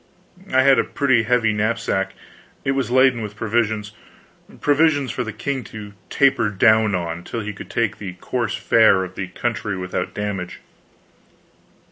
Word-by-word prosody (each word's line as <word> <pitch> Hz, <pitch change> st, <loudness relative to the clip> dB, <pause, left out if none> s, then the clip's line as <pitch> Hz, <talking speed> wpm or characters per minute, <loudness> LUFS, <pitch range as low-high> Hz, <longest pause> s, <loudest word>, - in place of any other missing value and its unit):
I 130 Hz, 0 st, +4 dB
had 135 Hz, 0 st, +5 dB
a -, -, +3 dB
pretty 130 Hz, -5 st, +2 dB
heavy 115 Hz, -1 st, +2 dB
knapsack; 105 Hz, -3 st, -1 dB, 0.5 s
it 135 Hz, -, +2 dB
was 135 Hz, -4 st, -1 dB
laden 130 Hz, -1 st, +4 dB
with 105 Hz, -1 st, -6 dB
provisions 110 Hz, -1 st, -1 dB, 0.7 s
provisions 145 Hz, -3 st, +2 dB
for 125 Hz, -, -3 dB
the 110 Hz, -, -5 dB
king 130 Hz, +5 st, -3 dB
to 105 Hz, -2 st, -9 dB, 0.2 s
taper 135 Hz, -6 st, +3 dB
down 110 Hz, +1 st, +3 dB
on, 85 Hz, -1 st, -4 dB
till 115 Hz, -, -5 dB
he 105 Hz, 0 st, -5 dB
could 100 Hz, -, -10 dB
take 110 Hz, -2 st, -1 dB
to -, -, -27 dB
the 95 Hz, -3 st, -6 dB
coarse 115 Hz, +5 st, -3 dB
fare 110 Hz, -6 st, +4 dB
of 90 Hz, 0 st, -7 dB
the 95 Hz, 0 st, -5 dB
country 110 Hz, +1 st, -3 dB
without 90 Hz, 0 st, -4 dB
damage. 100 Hz, -4 st, -4 dB
110 Hz, 160 wpm, -21 LUFS, 100-125 Hz, 0.7 s, had